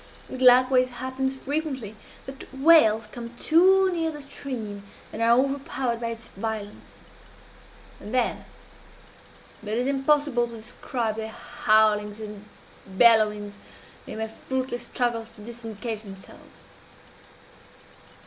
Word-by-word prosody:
It 260 - -6
likewise 255 0 +6
happens 260 +2 -3
frequently 270 -6 -3 0.3
that 270 0 -10
whales 265 -6 +5
come 235 +2 -9
too 375 +6 +4
near 325 -2 -1
the 295 -2 -7
stream, 240 -8 -6 0.3
and 225 - -5
are 230 +1 +5
overpowered 265 -3 -1
by 230 - -2
its 230 0 -7
violence; 210 0 -7 1.0
and 210 - -9
then 250 -1 0 1.2
it 215 +1 -3
is 245 - 0
impossible 275 -2 +2
to 235 - -11
describe 225 0 -4
their 220 0 -4
howlings 215 -1 +1
and 210 -1 -8 0.4
bellowings 210 0 +3 0.5
in - - -7
their 220 0 -3
fruitless 255 +1 -4
struggles 235 -2 -1
to 230 -2 -15
disengage 225 -1 -6
themselves. 195 -3 -14
235 Hz, 115 wpm, -25 LUFS, 220-265 Hz, 1.2 s, likewise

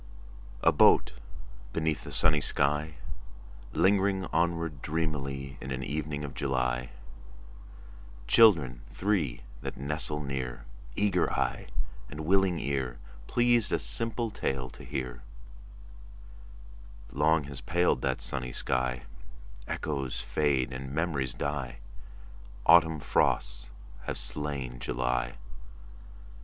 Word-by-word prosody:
A - - +6
boat - - +5 0.6
beneath 80 -3 -1
a - - -6
sunny 75 -1 +4
sky, 75 +3 +1 0.8
Lingering 95 +1 +3
onward 85 -4 0
dreamily 70 -4 -3
In 65 - -6
an 65 0 -3
evening 75 +1 -3
of 70 - -7
July— 60 -2 -1 1.4
Children 80 - +5
three 90 -12 0 0.2
that - - -5
nestle 75 +2 -1
near, 65 -4 -4 0.3
Eager 100 -4 +2
eye - - -1 0.4
and 75 +2 -6
willing 95 -1 +3
ear, 65 -3 -2 0.3
Pleased 120 -3 +3
a - - +3
simple 115 0 0
tale 65 -8 -2
to - - -11
hear— 60 -2 -4 1.9
Long 75 +2 +3
has 70 -2 -7
paled 85 +1 +2
that 65 -1 -1
sunny 65 -2 -3
sky: 65 0 0 0.6
Echoes 70 -4 -2
fade 65 -4 +1
and 65 +1 -6
memories 70 -5 -1
die. 70 -4 -3 0.9
Autumn 80 -2 +6
frosts - - +1 0.4
have - - -3
slain 70 -5 -2
July. - - -1
70 Hz, 105 wpm, -29 LUFS, 65-80 Hz, 1.9 s, A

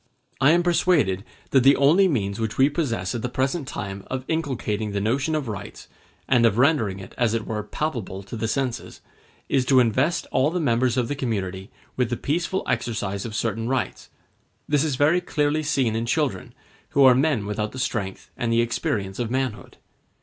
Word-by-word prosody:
I 135 +1 +5
am 170 +2 +4
persuaded 160 - +2 0.3
that 135 - +5
the 135 +3 +6
only 160 +8 +5
means 105 - -1
which 110 -2 -3
we 135 +2 +5
possess 115 - -2
at 120 - -3
the 125 - -2
present 135 +4 -1
time 100 -6 -5
of 130 0 -4
inculcating 115 -10 -2
the 100 - 0
notion 130 +9 0
of 150 -4 -2
rights, 100 -2 -7 0.4
and 120 -3 +4
of 115 -2 +3
rendering 125 -8 +2
it, 95 -1 -10
as 115 -2 +2
it 110 - -2
were, 110 -1 -3
palpable 105 -5 -4
to 100 - -8
the 110 0 -2
senses, 125 -1 -3 0.5
is 135 - +2
to 130 0 +5
invest 130 +7 +2
all 130 +3 +3
the 180 +2 -2
members 125 -4 +1
of 125 -2 +1
the - - -2
community 100 -8 -3 0.3
with 125 -2 +1
the 120 - -2
peaceful 175 +5 -1
exercise 100 -4 -2
of 110 - -7
certain 115 +1 -1
rights: 130 -1 -2 0.6
this 145 -1 +2
is 150 -4 0
very 155 +7 +3
clearly 150 -1 0
seen 135 -7 0
in 115 +1 -2
children, 130 - -1 0.3
who 140 - +3
are 130 -1 +8
men 130 -5 +1
without 105 +1 -2
the - - -9
strength 105 -7 -3
and 120 -1 -2
the 115 0 +4
experience 105 -4 -2
of 120 -2 -1
manhood. 130 -3 -3
125 Hz, 195 wpm, -24 LUFS, 110-140 Hz, 0.6 s, are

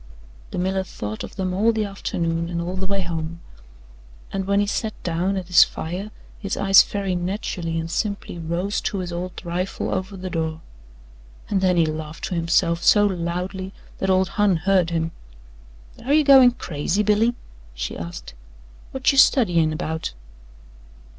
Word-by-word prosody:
The - - -6
miller 190 +1 0
thought 110 - -6
of - - -9
them 185 -2 -2
all 215 +5 +3
the 220 -1 -1
afternoon 170 -4 -2
and 170 -1 -3
all 175 +2 -3
the 190 0 -3
way 195 0 0
home, 165 -1 -4 0.9
and 195 -1 -2
when 200 0 +3
he 205 - +2
sat 215 +1 -2
down 180 +3 0
at 185 - -3
his 175 0 +7
fire 180 +6 -5 0.3
his 195 -1 -3
eyes 195 -1 +7
very 200 -2 -2
naturally 175 -2 -2
and 165 - -3
simply 200 -1 -3
rose 170 +5 -2
to 205 - -2
his 180 -2 -4
old 180 +1 -6
rifle 180 +2 -2
over 190 +1 -3
the 185 0 -6
door 160 -2 -2 0.9
and 195 -2 +2
then 185 -2 +3
he 165 - +4
laughed 155 0 -5
to - - -3
himself 170 0 +1
so 205 -1 +5
loudly 185 +1 -3 0.3
that 190 - -1
old 185 -1 +3
Hon 205 -2 +2
heard 180 +1 +2
him. 165 -1 -1 0.9
"Air 270 +4 -1
you 305 0 +5
goin' 265 -3 +7
crazy, 170 +2 -1
Billy?" 215 +3 +2 0.4
she - - -4
asked. 85 -5 -7 0.6
"Whut 265 +1 +2
you 275 - +3
studyin' 170 - +4
'bout?" 160 - -4
185 Hz, 165 wpm, -23 LUFS, 170-200 Hz, 0.9 s, his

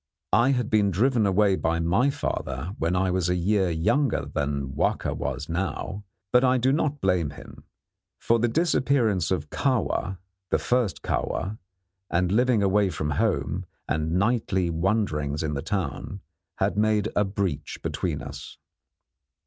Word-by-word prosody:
I 120 +4 +5
had 125 -4 -1
been 105 -2 +4
driven 110 +3 +2
away 100 0 +3
by 85 -2 0
my 90 +11 +2
father 70 - -3
when 85 +3 0
I 95 0 +1
was 90 -1 0
a 90 - +2
year 95 +1 +2
younger 100 - +1
than 70 -1 -2
Wahka - - 0
was 70 +5 -3
now, 95 +3 -3 0.3
but 125 +1 +6
I 130 0 +4
do 130 +2 +2
not 150 -1 0
blame 90 -5 +1
him; 75 - -12 0.5
for 115 0 +2
the 120 - +2
disappearance 125 - +2
of 75 -6 -2
Kahwa 120 -7 0 0.3
the - - +3
first 120 -6 0
Kahwa 100 +5 -2 0.5
and 90 +1 +1
living 120 0 +3
away 100 0 +3
from 75 -3 -3
home - - 0 0.2
and 80 +2 -1
nightly 95 -3 +1
wanderings 80 -5 0
in 75 -1 -1
the 70 - -2
town, 95 +2 -3 0.3
had 100 +1 0
made 110 0 +2
a 105 - +4
breach 95 -7 -3
between - - -2
us. - - -9
95 Hz, 150 wpm, -26 LUFS, 85-110 Hz, 0.5 s, but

